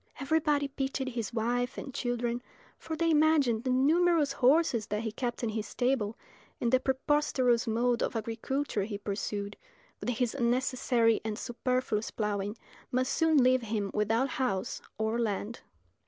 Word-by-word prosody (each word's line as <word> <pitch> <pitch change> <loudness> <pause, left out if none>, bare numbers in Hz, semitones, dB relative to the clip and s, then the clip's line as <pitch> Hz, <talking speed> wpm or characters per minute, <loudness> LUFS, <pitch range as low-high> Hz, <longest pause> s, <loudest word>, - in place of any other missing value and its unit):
Everybody 295 0 +1
pitied 270 -1 -3
his 235 -3 -4
wife 245 +2 -1
and 270 - -6
children, 240 -1 -2 0.4
for 320 - -5
they 330 +1 +1
imagined 295 -7 +3
the 260 - -1
numerous 305 +3 +3
horses 265 -4 +3
that 210 +2 -2
he 220 - -2
kept 240 +2 -3
in 230 - +1
his 215 -1 -3
stable, 245 -4 0 0.4
and 235 - 0
the 260 - +5
preposterous 260 -2 +1
mode 235 +2 +1
of - - -1
agriculture 230 +2 -2
he 205 -1 -4
pursued, 205 0 -4 0.4
with - - -3
his 245 -1 0
unnecessary 245 -2 +2
and 215 -1 -3
superfluous 245 -3 -1
ploughing, 205 0 -2 0.3
must 255 +1 +1
soon 315 -4 +4
leave 255 0 +4
him 210 -3 -2
without 225 +5 +1
house 250 -11 -2 0.2
or 220 +2 0
land. 220 0 -2
245 Hz, 150 wpm, -30 LUFS, 220-270 Hz, 0.4 s, the